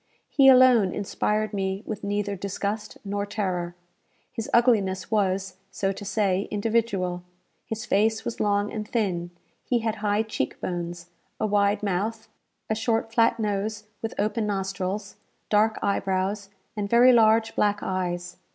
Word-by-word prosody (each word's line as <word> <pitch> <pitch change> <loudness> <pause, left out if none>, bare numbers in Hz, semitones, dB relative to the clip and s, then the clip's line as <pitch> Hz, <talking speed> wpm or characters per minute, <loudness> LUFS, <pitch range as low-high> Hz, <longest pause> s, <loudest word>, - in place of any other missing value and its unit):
He 275 -2 +5
alone 250 -7 +6
inspired 210 +1 -1
me 195 0 -2
with 215 -1 -5
neither 205 0 -1
disgust 200 +2 -4
nor 200 0 -2
terror. 180 -4 -2 0.6
His 225 -2 -5
ugliness 210 -6 +2
was, 190 -3 0
so 195 -1 -1
to 195 - -7
say, 200 -2 0
individual. 205 -4 0 0.5
His 220 +1 -4
face 220 +2 +1
was 235 - -4
long 205 0 +1
and 215 -2 -4
thin; 185 -7 -1 0.3
he 240 -2 0
had 220 -1 -1
high 210 +1 +1
cheek 215 -12 -3
bones, 175 -1 -5 0.3
a - - +1
wide 205 0 +2
mouth, 215 +4 -2 0.4
a - - 0
short 225 0 -1
flat 230 0 +3
nose 210 0 -2 0.2
with 225 - -4
open 215 +1 0
nostrils, 195 0 -3 0.3
dark 215 +1 +3
eyebrows, 195 0 -1 0.3
and 205 -1 -3
very 245 +3 +7
large 225 -1 +4
black 205 0 +1
eyes. 180 -1 -3
205 Hz, 140 wpm, -25 LUFS, 195-220 Hz, 0.6 s, very